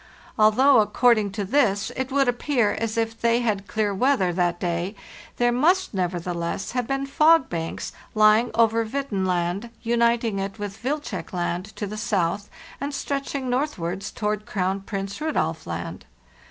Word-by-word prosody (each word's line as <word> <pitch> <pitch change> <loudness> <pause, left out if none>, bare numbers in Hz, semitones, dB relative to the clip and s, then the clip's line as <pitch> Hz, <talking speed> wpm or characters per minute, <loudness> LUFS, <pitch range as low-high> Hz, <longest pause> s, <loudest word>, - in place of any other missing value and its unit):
Although, 245 +5 +6
according 215 0 +3
to 205 -2 -2
this, 215 -3 +2
it 260 0 -3
would 275 -1 +3
appear 245 -2 +1
as 225 0 -3
if 225 0 -1
they 235 +1 +3
had 215 -4 +1
had 200 - -18
clear 205 +1 0
weather 195 -5 +2
that 175 -1 0
day, 175 +3 -2 0.4
there 240 0 +3
must, 330 +9 +2
nevertheless, 175 0 -2
have 250 -2 -2
been 275 0 -1
fog 310 +1 +4
banks 165 -1 -4 0.2
lying 215 +2 +5
over 230 0 +3
Hvidtenland, 195 -5 -1
uniting 235 -2 +2
it 195 +2 -4
with 205 -1 -6
Wilczek 290 -1 -3
Land 175 0 -2
to 210 - -3
the 210 +2 -6
south 200 -2 -1 0.3
and 280 0 -3
stretching 275 -1 -3
northward 245 - -1
towards 210 +1 -3
Crown 190 0 0
Prince 195 +4 -5
Rudolf 165 - -1
Land. 85 0 -5
215 Hz, 155 wpm, -24 LUFS, 190-250 Hz, 0.4 s, Although